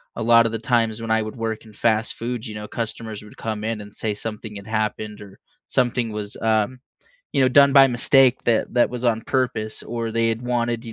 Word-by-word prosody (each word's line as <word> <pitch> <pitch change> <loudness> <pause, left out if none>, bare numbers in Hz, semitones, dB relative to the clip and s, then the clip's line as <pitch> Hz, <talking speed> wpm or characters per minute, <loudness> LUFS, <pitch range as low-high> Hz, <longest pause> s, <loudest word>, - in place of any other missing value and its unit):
a 115 - -3
lot 115 0 +6
of 115 - 0
the 115 - -2
times 115 -1 0
when 115 -1 -3
I 110 0 +3
would 110 0 -6
work 115 -1 -4
in 110 - -15
fast 110 0 +1
food, 120 0 -4
you 105 - -7
know, 105 0 -6
customers 115 -2 -4
would 105 - -14
come 110 -2 -4
in 110 -1 -2
and 105 0 -12
say 110 -1 -2
something 105 0 -6
had 100 +1 -9
happened 110 -1 -2
or 100 -1 -13 0.3
something 120 -2 0
was, 105 -1 -5
um, 110 +3 +1 0.5
you - - +2
know, 130 - +5
done 140 +2 +6
by 135 -1 +8
mistake 130 +1 +4
that 115 +1 +1
that 120 - +3
was 125 0 -5
on 115 -2 +2
purpose 115 -3 -2
or 115 -1 -3
they 115 0 +1
had 115 +2 -2
wanted, 120 -1 -1
you 115 - -7
115 Hz, 230 wpm, -22 LUFS, 110-120 Hz, 0.5 s, by